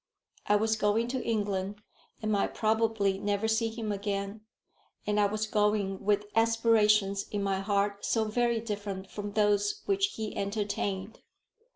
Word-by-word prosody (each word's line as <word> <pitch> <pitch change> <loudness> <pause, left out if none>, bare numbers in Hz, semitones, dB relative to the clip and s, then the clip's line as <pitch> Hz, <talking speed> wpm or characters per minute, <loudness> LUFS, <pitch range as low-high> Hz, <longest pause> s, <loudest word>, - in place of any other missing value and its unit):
I 205 - +4
was 220 +1 +2
going 215 +2 +2
to 255 0 -2
England, 205 -2 -2 0.4
and 215 - 0
might 200 -1 0
probably 220 -3 +1
never 205 +2 0
see 225 +1 +1
him 225 -1 -4
again; 200 +1 -3 0.6
and 210 0 +1
I 205 - +4
was 215 +2 -2
going 210 -2 0
with 205 0 +2
aspirations 215 -3 +3
in 205 -1 -2
my 195 -1 0
heart 200 0 0
so 225 - +1
very 235 +2 +1
different 205 -3 -5
from 205 -1 -5
those 205 -1 +1
which 395 0 +1
he 220 -1 -4
entertained! 200 0 -2
210 Hz, 150 wpm, -29 LUFS, 200-220 Hz, 0.6 s, I